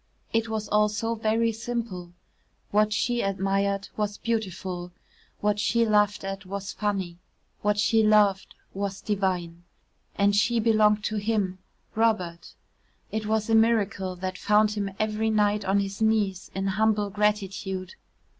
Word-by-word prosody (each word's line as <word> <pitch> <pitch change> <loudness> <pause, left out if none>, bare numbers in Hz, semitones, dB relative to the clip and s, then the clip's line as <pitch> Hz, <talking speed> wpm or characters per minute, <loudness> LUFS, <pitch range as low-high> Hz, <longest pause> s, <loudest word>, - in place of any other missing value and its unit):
It 225 0 +1
was 220 -1 -3
all 210 0 +3
so 225 +2 -2
very 225 +1 +1
simple 225 -6 -5 0.6
What 210 +1 +3
she 240 +3 0
admired 195 0 0
was 210 -1 -2
beautiful; 185 -5 -3 0.5
what 210 0 +1
she 235 +2 +2
laughed 210 -2 +2
at 195 0 -5
was 195 +1 -5
funny; 190 -5 -2 0.4
what 210 0 +1
she 220 +2 +3
loved 210 -3 +3 0.2
was 200 0 -3
divine 180 -4 -2 0.5
And 200 0 +3
she 235 +3 +2
belonged 215 -2 +3
to 215 0 -2
him 205 -3 -1 0.3
Robert. 200 -7 -1 0.6
It 215 -1 -3
was 220 -1 0
a 225 - 0
miracle 220 -4 +2
that 185 +1 -5
found 210 +1 +3
him 205 -2 -2
every 215 +1 0
night 210 -1 +2
on 195 +1 +2
his 195 +1 -5
knees 210 -4 +1
in 195 0 -2
humble 210 +1 +1
gratitude. 195 -2 -1
210 Hz, 140 wpm, -26 LUFS, 195-220 Hz, 0.6 s, all